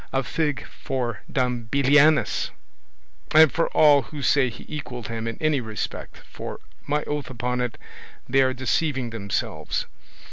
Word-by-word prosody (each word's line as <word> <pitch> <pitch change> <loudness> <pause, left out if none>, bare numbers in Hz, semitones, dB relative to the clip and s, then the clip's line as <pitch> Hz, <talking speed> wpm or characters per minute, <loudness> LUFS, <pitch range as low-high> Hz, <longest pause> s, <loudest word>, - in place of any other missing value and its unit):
A 135 0 0
fig 145 -3 -1
for 125 -3 -4
Don 125 -3 0
Belianis, 140 +5 +4 0.9
and 155 -1 +8
for 165 - +1
all 145 -2 +6
who 145 0 -8
say 135 -2 +3
he - - -11
equalled 125 -6 -6
him 115 0 -4
in 115 - -4
any 155 -3 +1
respect, 110 -2 -5
for, - - -7 0.3
my 150 +1 0
oath 145 -3 -3
upon 125 0 -2
it, 120 -3 -3 0.5
they 135 +2 +4
are 130 0 +3
deceiving 130 -1 0
themselves! 100 -4 -2
130 Hz, 145 wpm, -24 LUFS, 120-145 Hz, 0.9 s, and